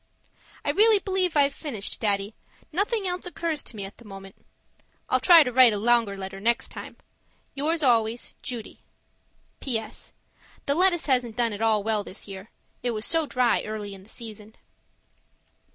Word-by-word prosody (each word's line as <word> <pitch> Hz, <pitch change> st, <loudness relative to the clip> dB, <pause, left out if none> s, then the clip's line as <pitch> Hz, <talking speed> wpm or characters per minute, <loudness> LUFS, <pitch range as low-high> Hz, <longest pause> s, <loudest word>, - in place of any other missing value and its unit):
I -, -, +2 dB
really 435 Hz, +1 st, +5 dB
believe 375 Hz, -4 st, 0 dB
I've 280 Hz, -1 st, +4 dB
finished, 235 Hz, -12 st, -4 dB
Daddy. 200 Hz, -1 st, 0 dB, 0.4 s
Nothing 405 Hz, +4 st, 0 dB
else 360 Hz, 0 st, -3 dB
occurs 335 Hz, -4 st, -2 dB
to -, -, -4 dB
me 200 Hz, -2 st, -5 dB
at 195 Hz, -, -11 dB
the -, -, -14 dB
moment 195 Hz, -2 st, -11 dB, 0.7 s
I'll -, -, +3 dB
try 340 Hz, -3 st, +8 dB
to 250 Hz, -, -3 dB
write 250 Hz, -2 st, +6 dB
a -, -, -1 dB
longer 225 Hz, -2 st, +2 dB
letter 195 Hz, 0 st, -7 dB
next 230 Hz, +3 st, +1 dB
time. -, -, -9 dB, 0.6 s
Yours 310 Hz, +3 st, -1 dB
always, 230 Hz, -2 st, +1 dB
Judy 235 Hz, -4 st, -7 dB, 0.8 s
PS. 225 Hz, -5 st, -4 dB, 0.5 s
The 280 Hz, -, +2 dB
lettuce 350 Hz, +1 st, +3 dB
hasn't 250 Hz, -5 st, +1 dB
done 235 Hz, -3 st, +2 dB
at 205 Hz, -, -6 dB
all 220 Hz, -2 st, +2 dB
well 215 Hz, -1 st, 0 dB
this 200 Hz, -, -10 dB
year. 195 Hz, +2 st, -9 dB, 0.3 s
It 245 Hz, -, -1 dB
was 215 Hz, +1 st, -1 dB
so 325 Hz, -2 st, +1 dB
dry 250 Hz, -3 st, +2 dB
early 210 Hz, -2 st, -6 dB
in 195 Hz, -, -11 dB
the 195 Hz, -, -18 dB
season. 220 Hz, -1 st, -9 dB
235 Hz, 170 wpm, -25 LUFS, 210-305 Hz, 0.8 s, try